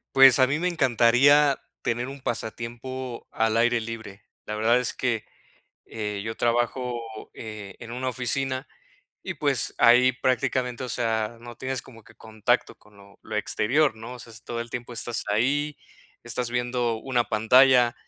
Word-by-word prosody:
Pues 135 Hz, -1 st, +8 dB
a 130 Hz, -, +6 dB
mí 145 Hz, +4 st, -1 dB
me 180 Hz, -, 0 dB
encantaría, 140 Hz, -1 st, +4 dB, 0.2 s
tener 120 Hz, +2 st, -1 dB
un 135 Hz, 0 st, -9 dB
pasatiempo 120 Hz, +2 st, -5 dB
al 110 Hz, 0 st, +1 dB
aire 120 Hz, 0 st, +3 dB
libre. 110 Hz, -3 st, -8 dB, 0.2 s
La 105 Hz, -, -5 dB
verdad 115 Hz, +3 st, +3 dB
es 125 Hz, -, 0 dB
que, 120 Hz, -4 st, -2 dB, 0.6 s
eh, 105 Hz, -2 st, -4 dB
yo 110 Hz, 0 st, -4 dB
trabajo, 120 Hz, +1 st, 0 dB, 0.3 s
eh, 105 Hz, -3 st, -8 dB
en 115 Hz, -1 st, -9 dB
una 130 Hz, +1 st, -2 dB
oficina, 130 Hz, +2 st, -2 dB, 0.6 s
y -, -, -5 dB
pues, -, -, 0 dB
ahí 125 Hz, +2 st, +6 dB
prácticamente, 130 Hz, -1 st, -1 dB
o 125 Hz, -, -4 dB
sea, 115 Hz, -1 st, -1 dB
no 120 Hz, 0 st, -10 dB
tienes 130 Hz, -1 st, -3 dB
como 115 Hz, -4 st, -15 dB
que -, -, -18 dB
contacto 110 Hz, +3 st, -1 dB
con 105 Hz, -1 st, -23 dB
lo 100 Hz, 0 st, -18 dB
lo 110 Hz, -1 st, -6 dB
exterior, 125 Hz, +5 st, +1 dB
¿no? 115 Hz, +3 st, -8 dB
O -, -, -10 dB
sea, 115 Hz, -1 st, -11 dB
es 110 Hz, -, -9 dB
todo 115 Hz, 0 st, -4 dB
el 120 Hz, -, -13 dB
tiempo 120 Hz, 0 st, -6 dB
estás 120 Hz, 0 st, -1 dB
ahí, 140 Hz, +7 st, +1 dB, 0.5 s
estás 125 Hz, -2 st, -2 dB
viendo 120 Hz, -1 st, -1 dB
una 120 Hz, 0 st, 0 dB
pantalla. 125 Hz, +2 st, +5 dB
120 Hz, 165 wpm, -25 LUFS, 115-130 Hz, 0.6 s, Pues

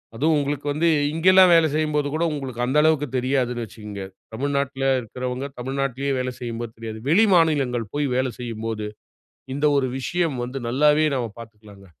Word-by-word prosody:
அதுவும் 155 Hz, +7 st, +2 dB
உங்களுக்கு 145 Hz, 0 st, -2 dB
வந்து 165 Hz, +3 st, +1 dB, 0.3 s
இங்கலாம் 185 Hz, +2 st, +6 dB
வேலை 165 Hz, -1 st, +5 dB
செய்யும்போது 150 Hz, -2 st, 0 dB
கூட 160 Hz, +2 st, 0 dB
உங்களுக்கு 130 Hz, -4 st, -4 dB
அந்த 130 Hz, +4 st, 0 dB
அளவுக்கு 155 Hz, -2 st, +2 dB
தெரியாதுன்னு 125 Hz, -2 st, 0 dB
வச்சுக்கங்க. 105 Hz, -2 st, -8 dB, 0.3 s
தமிழ்நாட்ல 140 Hz, +1 st, -1 dB, 0.2 s
இருக்கிறவங்க, 125 Hz, +3 st, -5 dB
தமிழ்நாட்லயே 135 Hz, +1 st, -2 dB
வேல 125 Hz, 0 st, -2 dB
செய்யும்போது 120 Hz, -1 st, -5 dB
தெரியாது. 110 Hz, -1 st, -7 dB
வெளி 200 Hz, +8 st, +5 dB
மாநிலங்கள் 135 Hz, -, +1 dB
போயி 145 Hz, -1 st, 0 dB
வேலை 130 Hz, -1 st, 0 dB
செய்யும்போது 115 Hz, -2 st, -4 dB, 0.7 s
இந்த 145 Hz, +2 st, +1 dB
ஒரு 130 Hz, -, +1 dB
விஷயம் 165 Hz, +1 st, -1 dB
வந்து 125 Hz, +2 st, -5 dB
நல்லாவே 150 Hz, +5 st, +3 dB
நம்ம 125 Hz, -2 st, -1 dB
பாத்துக்கலாங்க. 105 Hz, -3 st, -14 dB
135 Hz, 150 wpm, -23 LUFS, 120-150 Hz, 0.7 s, இங்கலாம்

